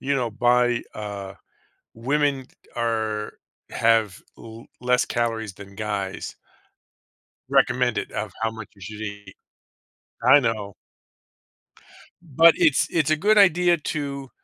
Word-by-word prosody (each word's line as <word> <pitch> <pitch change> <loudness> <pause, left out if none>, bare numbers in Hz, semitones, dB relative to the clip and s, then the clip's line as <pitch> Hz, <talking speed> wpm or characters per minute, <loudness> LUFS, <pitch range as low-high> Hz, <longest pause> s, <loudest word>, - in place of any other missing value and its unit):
you 140 +1 -1
know, 125 -3 -1
buy, 120 +1 +2
uh 100 -2 -6 0.6
women 140 +3 0 0.3
are 110 -2 -2 0.4
have 110 -5 +1 0.2
l 115 0 -12 0.2
less 125 0 +2
calories 115 -3 -2
than 100 +1 -13
guys 100 -2 -4 1.1
recommended 125 -2 +1
of 105 -3 -4
how 115 0 0
much 110 -2 -9
you 100 - -20
should 105 +2 -8
eat. 100 -2 -8 0.9
I 130 +4 +7
know. 110 -5 -2 1.5
But 165 0 +5
it's 160 -6 +3
it's 155 -3 +1
a - - +5
good 210 +7 +2
idea 180 -3 +5
to 140 -3 -5
115 Hz, 115 wpm, -23 LUFS, 105-140 Hz, 1.5 s, I